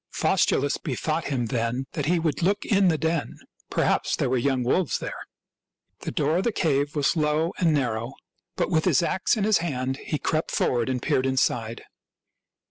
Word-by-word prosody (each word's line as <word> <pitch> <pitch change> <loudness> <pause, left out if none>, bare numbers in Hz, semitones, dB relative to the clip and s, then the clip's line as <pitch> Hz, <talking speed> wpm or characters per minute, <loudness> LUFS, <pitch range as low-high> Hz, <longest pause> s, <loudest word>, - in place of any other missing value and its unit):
Faustulus 140 +1 +1
bethought 155 +2 -2
him 130 -4 -1
then 115 +3 -1
that 150 -2 -3
he 175 +2 +3
would 160 -3 -1
look 200 +4 +1
in 200 -2 +3
the 165 -3 +3
den 160 0 -2 0.2
— - - -35
perhaps - - +1
there - - -1
were 130 - +2
young 130 0 +1
wolves 160 +7 +1
there. - - -7 0.7
The - - -5
door 150 +3 +1
of 185 - 0
the 235 - +1
cave 145 -6 0
was 145 +3 +2
low 155 +2 +1
and 170 -3 +3
narrow; 120 -4 -1 0.4
but - - -1
with 160 -2 +2
his 175 -3 +3
ax 185 +6 +1
in 210 - 0
his 210 -2 +3
hand 135 -5 -2
he 150 - -3
crept 155 +2 -1
forward 120 -1 0
and 130 -1 -1
peered 130 +1 +1
inside. 120 -4 0
145 Hz, 190 wpm, -25 LUFS, 130-165 Hz, 0.7 s, he